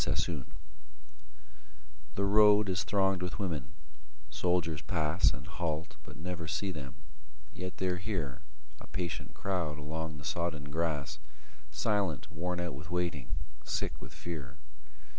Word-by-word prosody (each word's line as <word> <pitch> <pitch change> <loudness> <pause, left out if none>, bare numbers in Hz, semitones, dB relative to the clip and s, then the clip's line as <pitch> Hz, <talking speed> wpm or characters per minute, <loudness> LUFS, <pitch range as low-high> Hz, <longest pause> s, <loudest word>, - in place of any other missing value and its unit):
_ - - +4
THE - - +2
ROAD - - -4 1.7
The 100 - +2
road 105 0 +7
is 90 0 +2
thronged 95 -2 +3
with 90 -1 -2
women; 85 -6 -2 0.6
soldiers 85 -4 +2
pass 80 0 +4
And 65 - -6
halt, 80 +1 -2
but - - -11
never 85 0 -3
see 95 +4 0
them; 70 -5 -6 0.6
yet 90 0 -5
they're 90 -1 +1
here 90 - -2 0.4
A - - -11
patient 90 -2 -3
crowd 90 -6 0
along 80 +1 -3
the 70 - -9
sodden 80 -4 -1
grass, 75 -3 0 0.5
Silent, 100 -8 +1
worn 90 +2 -1
out 85 -4 -1
with 75 +5 -7
waiting, 85 -7 0 0.3
sick - - -1
with - - -8
fear. 75 -7 -5
85 Hz, 140 wpm, -33 LUFS, 75-90 Hz, 1.7 s, road